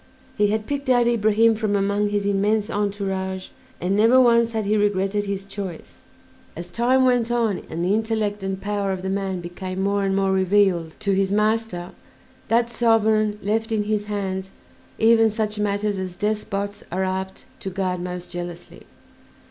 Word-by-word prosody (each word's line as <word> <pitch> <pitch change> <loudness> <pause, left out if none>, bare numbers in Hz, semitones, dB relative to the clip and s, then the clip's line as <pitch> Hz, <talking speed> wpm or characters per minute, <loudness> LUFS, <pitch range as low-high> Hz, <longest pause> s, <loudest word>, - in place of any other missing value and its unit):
He 205 -1 +3
had 215 +1 -1
picked 280 0 -3
out 245 -1 +4
Ibrahim 225 -1 +3
from 215 -2 -1
among 200 +1 +1
his 205 -1 -1
immense 205 +2 +1
entourage, 195 -2 -2 0.3
and 185 +3 0
never 225 +5 +5
once 235 -2 +4
had 220 -2 -1
he 210 +2 +2
regretted 205 0 +1
his 195 -1 -3
choice. 195 -4 -8 0.5
As 170 +2 -7
time 255 +6 +3
went 245 -2 +2
on 230 -5 0
and 170 +2 -2
the 190 - +2
intellect 215 -2 -1
and 190 0 -3
power 200 -1 -2
of 185 -1 -4
the 190 - -2
man 195 -2 -2
became 185 +2 -6
more 200 +1 +1
and 195 0 +1
more 195 0 +2
revealed 190 -3 +2
to 200 -2 +1
his 195 0 +1
master, 210 -4 0 0.6
that 235 +1 +2
sovereign 220 -2 +2
left 220 +3 -1
in 215 -2 +1
his 210 0 -1
hands 195 -2 -3 0.5
even 225 0 +5
such 215 -1 -2
matters 205 -1 0
as 185 -1 -5
despots 205 0 -2
are 185 +2 -1
apt 190 0 -4
to 195 - -5
guard 185 -1 -2
most 180 0 -6
jealously. 175 -1 -8
205 Hz, 170 wpm, -23 LUFS, 190-220 Hz, 0.6 s, never